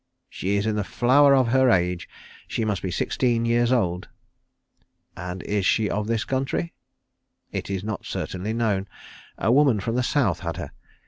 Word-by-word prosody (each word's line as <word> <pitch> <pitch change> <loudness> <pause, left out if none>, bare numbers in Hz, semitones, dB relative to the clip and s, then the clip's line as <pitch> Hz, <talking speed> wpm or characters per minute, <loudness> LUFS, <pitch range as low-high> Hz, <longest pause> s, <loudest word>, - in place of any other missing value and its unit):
"She 100 +2 -1
is 100 - -1
in 110 -1 0
the 105 - 0
flower 140 +7 +4
of 130 -3 +3
her 130 +1 +4
age. 90 -4 +1 0.4
She 115 - -2
must 105 -3 -1
be 95 - -3
sixteen 115 +5 0
years 120 +1 +2
old." 90 -8 0 1.1
"And 90 0 -6
is 105 -1 -1
she 105 +2 +2
of 105 0 -2
this 115 -1 0
country?" 135 +5 -2 0.8
"It - - -4
is 95 -1 -3
not 105 -2 -5
certainly 95 +4 -4
known. 105 -4 0 0.5
A 115 - +1
woman 135 -4 +4
from 115 +4 -2
the 125 - +1
South 125 - +1
had - - -4
her. - - -6
110 Hz, 175 wpm, -24 LUFS, 95-125 Hz, 1.1 s, flower